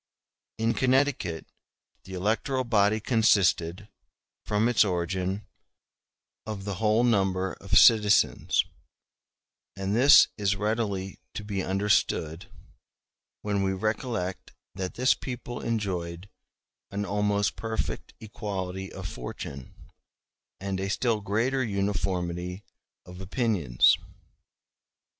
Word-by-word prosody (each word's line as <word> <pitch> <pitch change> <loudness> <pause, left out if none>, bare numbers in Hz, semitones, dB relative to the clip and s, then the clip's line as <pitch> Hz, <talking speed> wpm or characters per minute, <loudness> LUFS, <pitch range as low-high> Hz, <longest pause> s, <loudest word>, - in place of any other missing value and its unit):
In 115 +1 +1
Connecticut 130 - +1 0.6
the 95 - -8
electoral 115 +8 0
body 110 -2 +2
consisted, 100 -5 +2 0.6
from 105 +2 +1
its 120 -2 +4
origin, 95 +1 -2 1.0
of 105 -3 -6
the 100 - -2
whole 110 +2 +3
number 95 -5 +1
of 95 -1 +2
citizens; 105 -3 +5 1.1
and 95 +1 -2
this 140 +5 +8
is 100 -1 +1
readily 105 -2 -2 0.2
to 105 - -4
be 100 -2 -3
understood, 95 -4 0
*a - - -24 1.0
when 100 -1 0
we 95 0 +1
recollect 110 -1 -3 0.2
that 95 0 -5
this 125 +1 +4
people 125 -1 -6
enjoyed 95 -5 -3 0.6
an 100 +1 -3
almost 105 0 0
perfect 110 -1 -4
equality 95 -3 -5
of 95 -1 -6
fortune, 65 -1 -7 0.9
and 95 -1 -3
a 95 0 -2
still 110 0 0
greater 115 +7 0
uniformity 95 -3 -2 0.4
of 90 +1 -10
opinions. 95 - +2
100 Hz, 100 wpm, -27 LUFS, 95-110 Hz, 1.1 s, this